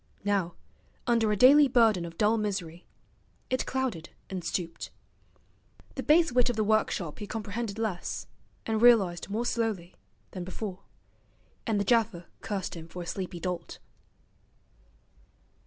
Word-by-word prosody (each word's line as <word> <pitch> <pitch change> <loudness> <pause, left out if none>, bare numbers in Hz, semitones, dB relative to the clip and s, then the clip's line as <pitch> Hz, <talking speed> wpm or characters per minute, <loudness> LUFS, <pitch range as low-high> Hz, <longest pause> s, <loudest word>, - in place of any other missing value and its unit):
Now, 195 -4 0 0.5
under 230 -3 +2
a - - +2
daily 280 +6 +8
burden 225 -8 +4
of 165 -1 -9
dull 215 +1 +3
misery, 190 -6 -3 0.6
it 255 - 0
clouded 250 -11 -2 0.2
and 185 -2 -4
stooped. 170 -1 -3 1.0
The - - -4
base 320 +1 +4
wit 250 0 +3
of 245 - -1
the 215 - +1
workshop 210 -6 0
he 210 - -6
comprehended 215 0 -4
less, 215 -6 -3 0.4
and 220 -1 0
realized 200 -8 +5
more 220 +4 -1
slowly, 220 -8 -1 0.4
than 185 - -5
before; 185 +1 -5 0.9
and 215 -3 +1
the - - +1
gaffer 220 -5 +2 0.2
cursed 200 -3 -3
him 165 -1 -8
for 175 +1 -7
a - - -9
sleepy 180 0 -4
dolt. 175 -1 -4
205 Hz, 140 wpm, -29 LUFS, 180-230 Hz, 1.0 s, daily